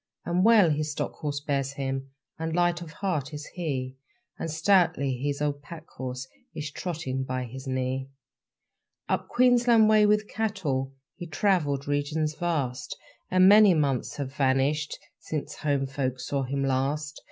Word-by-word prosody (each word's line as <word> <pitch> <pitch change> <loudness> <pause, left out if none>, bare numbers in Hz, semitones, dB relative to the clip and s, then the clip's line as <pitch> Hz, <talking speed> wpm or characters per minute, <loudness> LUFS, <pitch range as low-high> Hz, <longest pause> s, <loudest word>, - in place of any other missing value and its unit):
And 175 +2 +1
well 215 -7 +6
his 150 +1 -1
stock - - -3
horse 145 -3 -3
bears 140 -2 -1
him, 135 -1 -3 0.3
And 160 0 -2
light 175 0 +2
of 170 - -7
heart 155 -5 -2
is 150 0 -6
he, 135 -7 -3 0.4
And 165 - -3
stoutly 160 -5 +2
his 145 +3 -2
old 145 -1 -1
pack 160 +2 -10
horse 130 0 -6 0.3
Is 150 -1 -4
trotting 145 -7 -3
by 130 -1 -3
his 130 +3 -8
knee. 130 +1 -2 1.0
Up - - -1
Queensland 240 -3 +4
way 215 -1 +6
with 210 0 +2
cattle 155 -13 -2 0.2
He 175 - -8
travelled 150 -5 +1
regions 150 +2 0
vast; 145 -7 -2 0.3
And 185 0 +5
many 205 -2 +8
months 140 -5 0
have 135 -2 -5
vanished 140 +2 +1 0.2
Since 150 -1 -5
home 140 -3 0
folk 130 -2 -3
saw 135 +2 -2
him 135 +2 -2
last. 140 +3 -1
145 Hz, 155 wpm, -27 LUFS, 135-175 Hz, 1.0 s, many